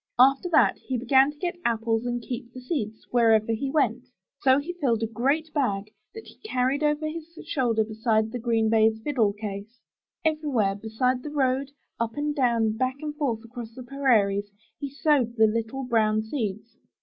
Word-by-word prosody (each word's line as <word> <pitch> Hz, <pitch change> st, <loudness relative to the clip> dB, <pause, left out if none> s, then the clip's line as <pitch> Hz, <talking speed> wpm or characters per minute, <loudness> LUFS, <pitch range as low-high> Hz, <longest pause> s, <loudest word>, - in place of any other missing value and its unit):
After 270 Hz, +7 st, +5 dB
that, 325 Hz, -, +4 dB
he 260 Hz, -, -3 dB
began 265 Hz, +3 st, +4 dB
to 295 Hz, -, -10 dB
get 350 Hz, +2 st, -3 dB
apples 225 Hz, 0 st, 0 dB
and 240 Hz, -1 st, -2 dB
keep 245 Hz, 0 st, -6 dB
the 255 Hz, -, -9 dB
seeds, 240 Hz, -5 st, -4 dB
wherever 225 Hz, -2 st, +4 dB
he 265 Hz, +5 st, -2 dB
went. 255 Hz, -4 st, +1 dB, 0.3 s
So 260 Hz, 0 st, +4 dB
he 305 Hz, +5 st, -3 dB
filled 250 Hz, -10 st, 0 dB
a -, -, +3 dB
great 280 Hz, +8 st, -1 dB
bag, 210 Hz, -8 st, -1 dB, 0.2 s
that 445 Hz, -, -9 dB
he -, -, -15 dB
carried 260 Hz, -6 st, 0 dB
over 300 Hz, 0 st, +1 dB
his 330 Hz, +1 st, -8 dB
shoulder 240 Hz, -8 st, +1 dB
beside 220 Hz, 0 st, 0 dB
the 245 Hz, -, -4 dB
green 225 Hz, -1 st, +1 dB
baize 220 Hz, 0 st, +3 dB
fiddle 235 Hz, -8 st, +2 dB
case. 205 Hz, +2 st, -7 dB, 0.5 s
Everywhere, 290 Hz, -11 st, +1 dB
beside 225 Hz, +5 st, -1 dB
the 300 Hz, -, -6 dB
road, 270 Hz, -1 st, 0 dB, 0.3 s
up 230 Hz, -1 st, -2 dB
and 295 Hz, 0 st, -1 dB
down, 230 Hz, -5 st, +1 dB
back 255 Hz, +2 st, 0 dB
and 300 Hz, -1 st, -4 dB
forth 240 Hz, -7 st, -2 dB
across 230 Hz, -1 st, -9 dB
the 255 Hz, -, -8 dB
prairies, 220 Hz, -7 st, +1 dB, 0.3 s
he 280 Hz, -, -4 dB
sowed 275 Hz, -4 st, +1 dB
the 220 Hz, -1 st, +5 dB
little 225 Hz, +4 st, -1 dB
brown 215 Hz, -3 st, +2 dB
seeds. 220 Hz, -2 st, -4 dB
245 Hz, 180 wpm, -26 LUFS, 220-280 Hz, 0.5 s, After